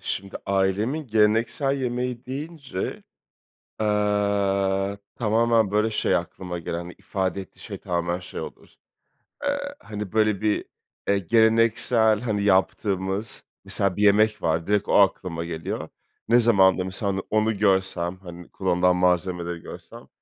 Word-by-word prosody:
şimdi 100 0 -4
ailemin 100 +10 0
geleneksel 115 +5 +2
yemeği 125 -1 -3
deyince, 140 - -5 1.0
eee, 100 -2 +1 0.2
tamamen, 115 -1 +2
böyle, 105 +2 +2
şey 105 - +1
aklıma 90 -2 -5
gelen, 85 +1 -5
ifade 95 -1 -2
ettiği 95 - -13
şey - - -7
tamamen 85 0 -2
şey 90 - -7
olur, - - -10 0.7
eee, 285 0 0 0.2
hani, 105 -3 -7
böyle, 110 -2 +2
bir, 105 -1 0 0.4
eee, 100 0 +3
geleneksel, 110 +1 +3
hani, 105 -4 -1
yaptığımız, 95 +1 0 0.2
mesela 100 -2 +2
bir 105 - -3
yemek 105 0 +4
var, 80 +1 0
direkt 105 -1 +1
o - - 0
aklıma 90 -4 +2
geliyor. 80 -1 -5 0.4
Ne 120 +2 +5
zaman 100 -5 +5
da 95 - -1
mesela 95 +2 -2
on 95 0 -3
onu 110 0 +1
görsem, 95 -3 +1
hani, 90 -2 -11
kullanılan 90 -1 +1
malzemeleri 90 -1 0
görsem - - -11
100 Hz, 130 wpm, -24 LUFS, 95-110 Hz, 1.0 s, Ne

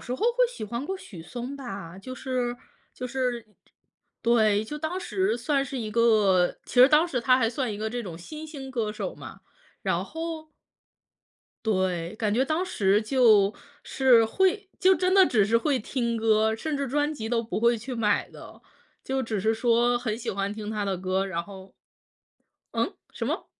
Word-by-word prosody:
时 250 - -4
候 - - -8
会 - - +3
喜 485 - -7
欢 235 +6 -4
过 385 +4 -3
许 210 - -11
嵩 245 +9 -6
吧， 195 -9 -8
就 255 +6 -8
是 250 -2 -2 0.4
就 250 - -5
是 250 -3 -2 0.8
对， 215 -3 +3
就 300 +7 -6
当 320 +4 -3
时 375 -5 0
算 275 +3 0
是 265 0 -5
一 215 -2 -4
个 210 -6 +3
其 - - -10
实 250 +2 +8
当 310 +3 +5
时 255 -8 -2
他 255 +1 +4
还 225 -3 +2
算 245 -2 -2
一 205 - -6
个 220 0 -2
这 240 +1 -4
种 175 -5 -7
新 310 - -8
兴 275 -4 -8
歌 225 -4 -2
手 - - -5
嘛。 - - -11 0.4
然 - - 0
后 325 -1 -6 1.1
对， 185 -3 -1
感 210 -2 0
觉 250 +4 +3
当 315 +5 0
时 205 - +2
就 215 -5 +4 0.3
是 250 -4 +4
会 380 - +1
就 375 +1 +5
真 370 0 +1
的 385 -2 +7
只 215 -4 +3
是 230 +3 +3
会 275 +1 +1
听 235 0 -2
歌， 220 0 +2
甚 305 +5 -3
至 280 -2 -2
专 295 +3 0
辑 220 -6 -5
都 230 0 +1
不 225 -1 -4
会 235 0 +4
去 245 +4 -6
买 210 -3 +1
的， - - -13 0.4
就 265 0 -1
只 220 -3 -2
是 220 +3 +2
说 240 +1 +2
很 225 -3 -2
喜 230 - -4
欢 200 +1 -2
听 215 -1 -6
他 210 -2 -2
的 195 -2 -1
歌， 190 +1 -1
然 170 -3 -3
后 190 0 -12 1.0
嗯？ - - -1 0.2
什 - - -4
么？ - - -2
235 Hz, 205 characters per minute, -26 LUFS, 215-275 Hz, 1.1 s, 实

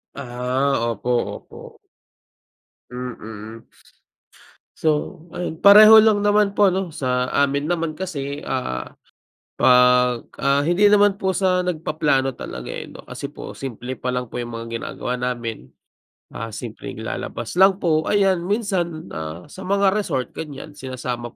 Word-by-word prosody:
Ah, 125 +3 -1 0.2
opo, 115 +3 -5 0.3
opo. - - -13 1.1
Mm. 115 -3 -8 1.1
So 155 +3 -1
ayun, 170 -1 -5
pareho 215 +2 +10
lang 210 -2 +3
naman 205 -1 +2
po 205 - +6
ano, 190 -1 -2
sa 125 -5 -1
amin 140 +2 +1
naman 165 -2 -1
kasi 145 -5 -5
ah, 65 0 -3 0.7
pag, 125 -1 +4
ah, 140 +1 +2
hindi 175 +7 +3
naman 205 -1 +5
po 190 -1 -1
sa 185 -1 +1
nag-paplano 155 -6 0
talaga - - -7
eh - - -5
no, - - -13
kasi - - -6
po - - -9
simple 130 -1 -6
pa 125 +1 -3
lang 125 -1 -3
po - - -9
yung 120 -1 -4
mga 115 0 -5
ginagawa 125 +2 -4
namin. 120 - -4 0.6
Ah, 115 -1 -6
simpleng 110 -1 -7
lalabas 115 +6 -5
lang 190 0 +5
po, 155 -2 +2
ayan 195 -3 +3
minsan 185 -7 -2
ah, 80 +2 -6
sa - - -11
mga 200 0 +3
resort 195 -11 -1
ganyan 150 -1 -8
sinasama 125 -3 -6
140 Hz, 140 wpm, -22 LUFS, 125-185 Hz, 1.1 s, pareho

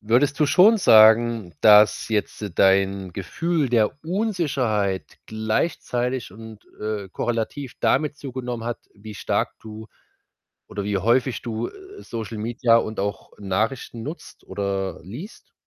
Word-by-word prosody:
Würdest 120 +7 +2
du 150 - +3
schon 190 - +6
sagen, 110 - +5
dass 105 0 +6
jetzt 105 -1 -2
dein 95 0 +2
Gefühl 150 - -1
der 115 0 +2
Unsicherheit 140 - -1
gleichzeitig 120 - -2
und, 110 0 -12 0.2
äh, 105 -2 -4
korrelativ 120 +6 -3
damit 150 +1 +1
zugenommen 125 -4 -6
hat, 120 0 -3 0.2
wie 105 +1 -11
stark - - -1
du 110 0 -10 0.8
oder 100 - -5
wie 105 -1 -1
häufig 120 +5 +1
du, 115 -1 -3
äh, 395 +1 -13
Social 115 -1 -6
Media 115 +1 +2
und 110 -2 -1
auch 100 +1 -4
Nachrichten 110 +4 -2
nutzt 155 +8 -9
oder 95 0 -3
liest? 125 - -10
115 Hz, 125 wpm, -23 LUFS, 105-130 Hz, 0.8 s, schon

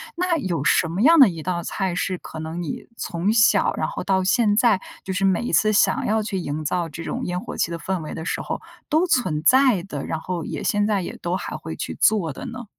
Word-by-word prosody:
那 355 -1 +1
有 175 - -2
什 165 +2 +3
么 175 +5 -2
样 325 +6 +6
的 265 - +9
一 165 -3 -6
道 175 0 -2
菜 190 -3 -2
是 185 0 -1
可 160 - -9
能 160 +2 -5
你 165 - -5
从 180 +6 -1
小 215 -1 +4
然 - - 0
后 - - -5
到 190 -1 +1
现 210 +1 +3
在， 225 -3 +4 0.2
就 190 - -5
是 190 +1 0
每 190 -2 +2
一 240 - -3
次 215 0 +3
想 205 - +3
要 220 +1 +1
去 205 -2 -3
营 155 -3 -3
造 170 +2 -1
这 165 +2 -8
种 - - -4
烟 180 0 -2
火 245 - -7
气 - - 0
的 170 - -4
氛 185 0 -3
围 155 - -6
的 160 - -6
时 - - -2
候 - - -4 0.3
都 320 +3 +3
存 245 - +1
在 255 -7 +4
的， 150 -8 -6
然 160 - -3
后 175 -1 -4
也 - - -5
现 205 0 +1
在 205 -3 +1
也 - - -6
都 175 +1 -1
还 - - -5
会 - - -6
去 - - -5
做 180 -9 +2
的 - - -8
呢？ 245 0 -7
190 Hz, 270 characters per minute, -23 LUFS, 170-220 Hz, 0.3 s, 的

